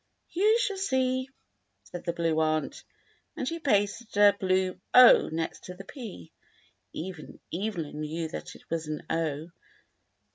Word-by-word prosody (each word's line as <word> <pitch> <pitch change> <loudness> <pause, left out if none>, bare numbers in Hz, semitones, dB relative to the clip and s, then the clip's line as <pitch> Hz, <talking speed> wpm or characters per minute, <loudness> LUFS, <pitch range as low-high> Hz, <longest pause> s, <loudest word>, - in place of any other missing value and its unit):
"You 425 +6 +4
shall 430 -5 -1
see," 260 -6 0 0.5
said 175 - -9
the 170 - +1
Blue 165 -2 0
Aunt, 155 0 0 0.5
and 260 - -2
she 335 +4 -3
pasted 210 -5 0
a 205 -1 +7
blue 185 -1 0 0.5
next 160 0 -4
the 180 +2 -9
P. 215 - -9 0.6
Even 175 -2 -7
Evelyn 170 -6 -3
knew 160 +2 -3
that - - -7
it - - -17
was 165 -1 -2
an 155 0 -4
0. 160 -1 -1
185 Hz, 135 wpm, -28 LUFS, 160-245 Hz, 0.6 s, a